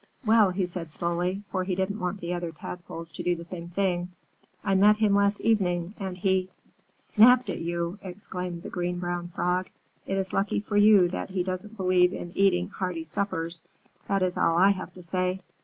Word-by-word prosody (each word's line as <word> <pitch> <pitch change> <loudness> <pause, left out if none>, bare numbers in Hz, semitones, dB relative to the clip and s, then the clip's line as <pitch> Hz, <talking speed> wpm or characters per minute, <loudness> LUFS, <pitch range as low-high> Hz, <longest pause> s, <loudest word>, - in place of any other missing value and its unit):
"Well," 220 -2 +5
he 185 0 -1
said 175 -2 -6
slowly, 175 +4 -2
for 185 -1 0
he 185 0 -2
didn't 190 +3 -2
want 180 +2 -3
the 175 +1 -3
other 175 -1 -3
Tadpoles 165 +1 -8
to - - -6
do 175 - +1
the 170 - -8
same 170 0 -8
thing, 180 -1 0 0.5
"I 195 - +1
met 205 +2 +6
him 215 -2 +3
last 200 0 +2
evening 180 -5 +1
and 190 -2 -4
he 190 -1 +1 0.2
" - - -40
"Snapped 250 +3 +5
at - - -4
you!" 170 +3 -3
exclaimed 180 -2 -6
the - - -6
Green 175 0 -2
Brown 175 0 -3
Frog. 180 +1 -1 0.4
"It 195 - -1
is 190 -1 -2
lucky 195 +1 +1
for 205 0 -5
you 205 -3 +7
that 185 - -4
he 185 -1 -1
doesn't 190 +4 -5
believe 185 -1 +3
in 175 - -6
eating 185 -2 +3
hearty 180 -5 -3
suppers, 165 0 -3 0.5
that 195 -1 +1
is 180 -1 -1
all 165 - +3
I 195 +3 +6
have 190 - -4
to 180 - -11
say! 185 +2 -1
185 Hz, 200 wpm, -27 LUFS, 175-195 Hz, 0.5 s, you